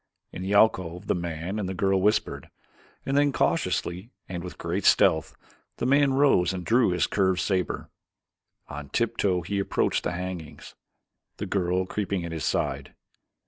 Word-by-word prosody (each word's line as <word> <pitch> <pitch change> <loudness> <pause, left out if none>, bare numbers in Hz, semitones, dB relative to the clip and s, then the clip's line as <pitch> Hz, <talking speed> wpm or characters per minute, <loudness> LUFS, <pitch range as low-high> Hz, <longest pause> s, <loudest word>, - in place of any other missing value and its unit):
In - - -7
the 95 +2 -1
alcove 95 -4 +2
the - - +1
man 85 +3 -4
and 95 -3 -3
the 95 - -4
girl 95 +1 +1
whispered, 105 +2 0 0.6
and 135 - -1
then 145 0 +4
cautiously 90 -5 -1 0.2
and 90 -2 -5
with 90 - -8
great 90 +4 -3
stealth, 80 -3 +3 0.4
the - - -2
man 140 +1 +3
rose 115 -11 +3
and 90 -2 -5
drew 120 +2 +3
his 90 -1 +1
curved 95 -2 +1
saber. 95 0 -1 0.8
On 75 -1 -8
tiptoe 105 -6 0
he 100 +3 -3
approached 100 - 0
the - - -2
hangings, 90 -4 -7 0.6
the 105 - -4
girl 95 -1 0
creeping 100 -2 -3
at 85 - -6
his 80 -2 -3
side. - - -2
95 Hz, 160 wpm, -26 LUFS, 90-105 Hz, 0.8 s, then